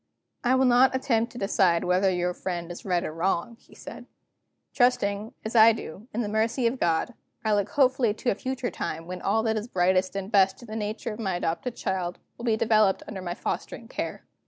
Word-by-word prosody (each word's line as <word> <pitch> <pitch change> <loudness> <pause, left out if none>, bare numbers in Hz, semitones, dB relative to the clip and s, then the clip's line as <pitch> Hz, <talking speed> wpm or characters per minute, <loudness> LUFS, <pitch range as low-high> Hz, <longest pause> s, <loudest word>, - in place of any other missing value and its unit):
"I 250 +1 +3
will 260 0 +3
not 255 +1 +5
attempt 235 -3 +1
to - - -9
decide 190 -5 +2
whether 185 +2 +3
your 180 -1 0
friend 175 -2 -4
is 175 - -9
right 180 -3 +1
or 155 - -4
wrong," 180 +6 -1
he - - -20
said. - - -10 0.7
"Trusting, 220 -4 +1
as 220 - -4
I 225 0 +8
do, 210 +1 -8
in 235 - -2
the - - -3
mercy 225 +4 0
of 240 +3 0
God, 170 +8 +1 0.3
I 215 - +3
look 205 -1 +1
hopefully 260 -4 +3
to 240 - 0
a - - +2
future 255 +3 -3
time 165 +1 -4
when 180 +1 -6
all 220 +3 +1
that 220 -1 +1
is 215 +2 -4
brightest 185 -1 +1
and 195 +1 -4
best 195 +1 +3
in - - -12
the 215 - -6
nature 215 +1 -3
of 210 - -10
my 195 -5 -1
adopted 175 +8 -2
child 180 -2 -2 0.2
will 240 - -8
be 225 -2 +2
developed 215 -3 +3
under 195 -3 -6
my 175 -1 -4
fostering - - -4
care. - - -5
210 Hz, 215 wpm, -26 LUFS, 185-235 Hz, 0.7 s, I